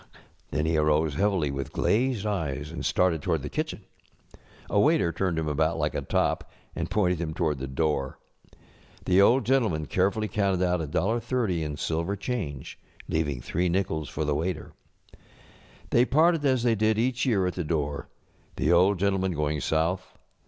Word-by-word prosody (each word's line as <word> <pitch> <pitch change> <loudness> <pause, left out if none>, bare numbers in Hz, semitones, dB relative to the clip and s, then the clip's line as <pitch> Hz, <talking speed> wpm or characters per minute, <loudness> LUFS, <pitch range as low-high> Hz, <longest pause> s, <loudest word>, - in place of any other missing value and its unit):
ŌĆØ - - -25 0.4
Then 75 +1 -1
he 80 0 +1
arose 75 0 +2
heavily 90 -3 +1
with 70 0 -4
glazed 120 -1 +1
eyes 75 -8 -2
and 85 - -6
started 90 -4 +2
toward - - -1
the - - -4
kitchen. - - -4 0.8
A - - +1
waiter 85 - +3
turned 85 0 -1
him 80 -1 -1
about 80 +2 +1
like 75 -1 -1
a - - -2
top, - - 0 0.3
and - - -3
pointed 90 -5 +1
him 80 -2 -3
toward 80 -5 0
the 65 - -4
door. 70 -1 -1 0.9
The 95 +1 +4
Old 120 +5 +4
Gentleman 115 - +1
carefully 100 +6 0
counted 100 -4 0
out 90 0 +1
$1.S0 100 - -1
in 75 -2 -4
silver 85 +6 -1
change, 95 - -5 0.3
leaving 75 -5 -1
three 90 +8 -1
nickels 80 -5 -1
for 80 - -3
the 75 - +1
waiter. 80 +1 -3 1.2
They 120 +1 +5
parted 160 +4 +3
as 130 -3 +2
they 120 -2 +3
did 110 0 +1
each 125 +2 0
year 100 -7 +2
at 90 - -1
the 90 - -3
door, 75 -3 -2 0.5
the 75 - +1
Old 90 +3 +4
Gentleman 95 -1 0
going 75 -1 -1
south. 85 +6 -1
85 Hz, 170 wpm, -27 LUFS, 75-100 Hz, 1.2 s, They